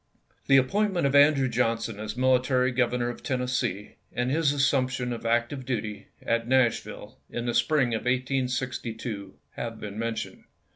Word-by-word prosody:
T 135 - +6
1 130 - +2
1HE - - -11
appointment 200 -2 +1
of 140 - +1
Andrew 140 -1 +5
Johnson 115 -3 -1
as 110 0 -5
mili 130 0 +3
J 125 - -7
tary 130 -1 +2
governor 125 -1 0
of 120 - -7
Tennessee, 125 -6 -2
and 125 +1 -1
his 155 -1 +2
assump 140 -2 +2
tion 125 -1 -3
of 115 0 -5
active 120 +4 0
duty, 110 -5 -4 0.2
at 115 0 0
Nashville, 130 -2 0
in 120 - -4
the 120 - -1
spring 145 -4 +2
of 110 - 0
1862, 125 -4 -2 0.2
have 115 -1 -6
been 105 0 -6
mentioned. 115 0 -4
125 Hz, 175 wpm, -27 LUFS, 115-130 Hz, 0.2 s, T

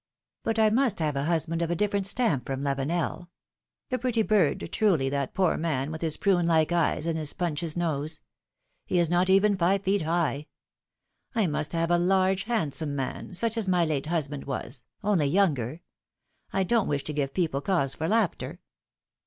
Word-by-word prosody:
But 225 0 -1
I 220 -1 +4
must 240 -2 +2
have 155 -3 -1
a 140 +1 -1
husband 165 0 0
of 170 - 0
a 175 - 0
different 200 +1 +1
stamp 200 - +1
from 135 0 -3
Lavenel. 160 +5 -2 0.6
A 255 - 0
pretty 235 -2 +1
bird, 205 -8 +2
truly, 175 -12 +2
that 140 -1 -3
poor 190 -1 +2
man, 155 -3 -1
with 160 - -6
his 160 -2 +2
prune 180 -4 +2
like 160 -1 +3
eyes 170 -2 +1
and 165 -1 -1
his 150 -2 -4
Punch's 170 -2 -2
nose! 155 -2 -1 0.7
He 180 - 0
is 170 -1 +2
not 180 +2 +2
even 195 +2 +4
five 190 +2 +1
feet 195 0 +1
high! 160 -2 -1 0.9
I 220 -3 +3
must 155 -1 -2
have 165 0 0
a 175 - +4
large, 190 +1 +2
handsome 155 - -1
man, 135 +6 -4
such 230 +4 0
as 220 -3 -1
my 180 -2 +3
late 150 -2 -2
husband 150 -4 -2
was, 135 -1 -4 0.2
only 195 -8 +2
younger, 150 - +1 0.7
I 195 - +1
don't 225 +2 +1
wish 140 -1 -1
to 150 - -3
give 140 -2 -2
people 160 -7 0
cause 140 -7 0
for 160 - -3
laughter 215 -3 0
170 Hz, 185 wpm, -27 LUFS, 150-195 Hz, 0.9 s, I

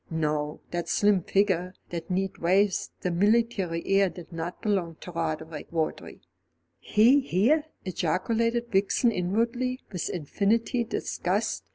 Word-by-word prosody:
No, 150 -2 -1
that 175 -1 -3
slim 205 -2 +3
figure, 185 -1 +1 0.2
that 170 0 -5
neat 190 +1 -1
waist, 190 +3 +2
that 180 - -1
military 200 -3 +1
air 195 0 +3
did 175 -1 -11
not 165 +2 -5
belong 185 -6 -1
to 180 - -8
Roderick 160 -2 -4
Vawdrey. 160 -2 -3 0.6
"He 235 +7 +5
here!" 270 - +2 0.2
ejaculated 230 +7 0
Vixen 200 +5 +3
inwardly, 230 +7 0
with 180 -4 -3
infinite 225 - 0
disgust. - - -1
190 Hz, 125 wpm, -27 LUFS, 170-225 Hz, 0.6 s, He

